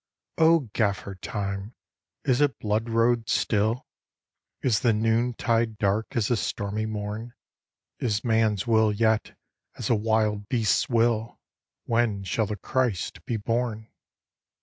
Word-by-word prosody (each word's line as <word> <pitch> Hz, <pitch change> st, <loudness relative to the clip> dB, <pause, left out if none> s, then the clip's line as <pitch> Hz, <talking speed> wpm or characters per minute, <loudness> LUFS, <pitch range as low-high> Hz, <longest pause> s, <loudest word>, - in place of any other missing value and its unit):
" -, -, -51 dB
O 165 Hz, -1 st, +5 dB
Gaffer 100 Hz, -3 st, 0 dB
Time, 100 Hz, +2 st, -5 dB, 0.5 s
is 130 Hz, +2 st, +2 dB
it 145 Hz, -6 st, +2 dB
blood 110 Hz, +2 st, -1 dB
road 115 Hz, 0 st, +2 dB
still? 110 Hz, +3 st, +1 dB, 0.8 s
Is 115 Hz, -5 st, +3 dB
the 120 Hz, -3 st, +3 dB
noontide 115 Hz, 0 st, +1 dB
dark 105 Hz, +6 st, 0 dB
as 115 Hz, -4 st, +1 dB
the 120 Hz, -, +2 dB
stormy 105 Hz, +1 st, -2 dB
morn? 110 Hz, +2 st, -5 dB, 0.6 s
Is 110 Hz, -4 st, -1 dB
man 110 Hz, -2 st, +3 dB
s 100 Hz, +1 st, -4 dB
will 110 Hz, -2 st, +3 dB
yet 110 Hz, +1 st, +1 dB, 0.4 s
as 120 Hz, -1 st, -2 dB
a -, -, +5 dB
wild 105 Hz, -1 st, 0 dB
beast 115 Hz, -5 st, +2 dB
s -, -, -24 dB
will? 115 Hz, -1 st, +1 dB, 0.5 s
When 115 Hz, -4 st, +1 dB
shall 105 Hz, +3 st, 0 dB
the 105 Hz, -, -3 dB
Christ 120 Hz, -2 st, -2 dB
be 115 Hz, -, -1 dB
born? 110 Hz, 0 st, -2 dB
110 Hz, 140 wpm, -26 LUFS, 105-115 Hz, 0.8 s, O